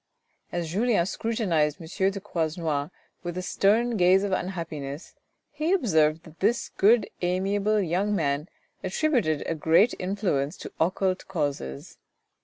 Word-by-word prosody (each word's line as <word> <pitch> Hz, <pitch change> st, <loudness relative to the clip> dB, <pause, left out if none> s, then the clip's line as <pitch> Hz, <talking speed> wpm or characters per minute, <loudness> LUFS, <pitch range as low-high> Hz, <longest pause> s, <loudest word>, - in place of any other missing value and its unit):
As 170 Hz, -2 st, -3 dB
Julien 210 Hz, -2 st, +2 dB
scrutinized 185 Hz, -, 0 dB
M. 185 Hz, +3 st, 0 dB
de 200 Hz, -, -5 dB
Croisenois 160 Hz, -5 st, -2 dB, 0.3 s
with 175 Hz, -1 st, -5 dB
a 185 Hz, -, -3 dB
stern 220 Hz, +6 st, +2 dB
gaze 185 Hz, +1 st, +5 dB
of 200 Hz, -, -1 dB
unhappiness, 165 Hz, -5 st, -4 dB, 0.4 s
he 305 Hz, +5 st, 0 dB
observed 160 Hz, -, +2 dB
that 160 Hz, -1 st, -16 dB
this 225 Hz, +5 st, +1 dB
good 220 Hz, +4 st, +4 dB
amiable 195 Hz, +4 st, +1 dB
young 195 Hz, +3 st, 0 dB
man 150 Hz, -2 st, -1 dB, 0.3 s
attributed 190 Hz, -, +1 dB
a -, -, -1 dB
great 165 Hz, +8 st, +4 dB
influence 180 Hz, -6 st, -1 dB
to -, -, -9 dB
occult 185 Hz, +2 st, 0 dB
causes. 145 Hz, -, -4 dB
185 Hz, 130 wpm, -26 LUFS, 160-205 Hz, 0.4 s, gaze